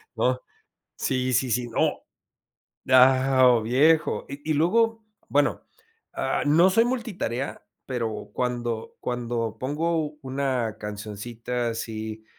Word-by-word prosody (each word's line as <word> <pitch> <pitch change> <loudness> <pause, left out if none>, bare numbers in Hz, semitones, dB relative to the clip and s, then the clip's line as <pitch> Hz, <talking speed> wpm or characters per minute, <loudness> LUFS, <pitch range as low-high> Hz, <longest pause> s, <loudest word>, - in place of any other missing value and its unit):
¿no?, - - +1 0.6
sí 130 -1 -1
sí 125 0 +1
sí, 120 +1 0
no, 115 - +1 0.9
ah, 130 0 +6
¡oh 120 -2 +5
viejo! 145 +8 +3
Y 145 +3 -5
y - - +3
luego, 225 +8 +2 0.2
bueno, - - +2 0.5
ah, - - -1
no 165 +6 +5
soy 225 +5 +4
multitarea, 220 - -3 0.2
pero 115 -5 -4
cuando 120 -2 -3
cuando 120 -2 -3
pongo 150 +3 -1
una 130 -4 -1
cancioncita 110 +3 -4
así, 110 -1 -5
125 Hz, 110 wpm, -25 LUFS, 115-150 Hz, 0.9 s, ah